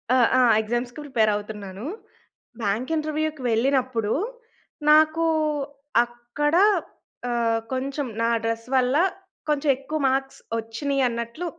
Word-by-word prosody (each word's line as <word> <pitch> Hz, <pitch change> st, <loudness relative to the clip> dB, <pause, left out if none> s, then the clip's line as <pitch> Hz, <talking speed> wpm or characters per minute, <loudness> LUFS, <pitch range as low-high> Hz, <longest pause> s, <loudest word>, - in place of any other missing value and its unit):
ఆహ్, 245 Hz, -3 st, +5 dB
అ! -, -, +6 dB, 0.2 s
ఎగ్జామ్స్‌కి 240 Hz, +4 st, -3 dB
ప్రిపేర్ 225 Hz, -7 st, +2 dB
అవుతున్నాను. 205 Hz, -1 st, -7 dB, 0.8 s
బ్యాంక్ 225 Hz, +8 st, -1 dB
ఇంటర్వ్యూ‌కి 310 Hz, -1 st, -2 dB
వెళ్ళినప్పుడు 240 Hz, -2 st, +1 dB, 0.8 s
నాకు 315 Hz, +2 st, +5 dB, 0.8 s
అక్కడ, 240 Hz, +6 st, -2 dB, 0.8 s
ఆహ్, 230 Hz, -1 st, +1 dB
కొంచెం 275 Hz, +2 st, -2 dB
నా 230 Hz, -, +2 dB, 0.2 s
డ్రెస్ 230 Hz, 0 st, -2 dB
వల్ల 255 Hz, +1 st, +2 dB, 0.5 s
కొంచెం 295 Hz, 0 st, +1 dB
ఎక్కువ 285 Hz, +4 st, -4 dB
మార్క్స్ 270 Hz, +1 st, -2 dB, 0.2 s
ఒచ్చినియి 260 Hz, +5 st, -1 dB
అన్నట్లు 235 Hz, +8 st, -4 dB
250 Hz, 105 wpm, -24 LUFS, 230-285 Hz, 0.8 s, అ